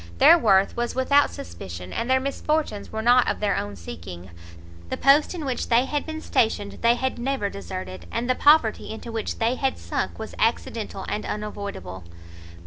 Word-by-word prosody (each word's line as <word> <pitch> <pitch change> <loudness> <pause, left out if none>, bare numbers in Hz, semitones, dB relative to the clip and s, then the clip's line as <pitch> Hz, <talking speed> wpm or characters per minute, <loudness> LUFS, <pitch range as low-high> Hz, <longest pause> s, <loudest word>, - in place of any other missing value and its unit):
Their 335 - +8
worth 200 - +3
was 240 0 -2
without 280 +2 +4
suspicion, 85 +1 -8
and 235 - -2
their 260 0 +4
misfortunes 275 -4 -2
were 220 0 -3
not 245 +1 +5
of - - -2
their 210 -1 +1
own 100 0 -3
seeking; 85 +1 -9 0.6
the - - -3
post 290 +6 +4
in 320 -4 -5
which 255 -3 -2
they 240 +2 +4
had 295 +3 -2
been 315 0 -5
stationed 205 -6 0
they 235 +1 +4
had 260 0 -2
never 255 -5 -1
deserted, 95 -2 -7
and 240 - -2
the 255 - +3
poverty 290 -5 +4
into 220 +2 -7
which 225 -1 -3
they 230 +2 +1
had 265 0 -1
sunk - - -3
was - - -7
accidental - - -1
and - - -2
unavoidable. 200 - -6
230 Hz, 180 wpm, -24 LUFS, -, 0.6 s, Their